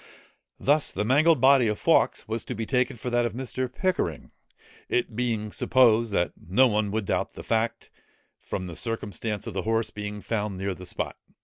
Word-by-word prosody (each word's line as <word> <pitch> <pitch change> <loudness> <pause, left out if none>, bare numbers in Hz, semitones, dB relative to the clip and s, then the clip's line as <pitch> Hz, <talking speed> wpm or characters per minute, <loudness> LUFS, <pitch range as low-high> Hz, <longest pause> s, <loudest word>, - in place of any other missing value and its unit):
Thus 145 +2 +2
the 105 - -2
mangled 150 +5 +4
body 130 -1 +6
of 105 -1 0
Fawkes - - +2
was 110 0 -3
to 125 - -4
be 110 +1 -3
taken 125 0 0
for 125 +2 -5
that 120 0 +2
of 110 - -7
Mr. 130 0 -4
Pickering, 145 - -2 0.6
it 120 -2 0
being 115 -3 -1
supposed 115 -3 +3
that 90 -3 0
no 100 +11 +3
one 105 -2 0
would 110 0 -2
doubt - - -1
the - - -9
fact, 115 +1 -1 0.5
from 95 - -5
the 85 -2 -7
circumstance 105 -1 -3
of - - -5
the 95 - -2
horse 110 +1 0
being 105 0 -5
found 105 -3 -2
near 95 +1 -2
the 90 0 -10
spot. - - -4
115 Hz, 190 wpm, -26 LUFS, 105-125 Hz, 0.6 s, body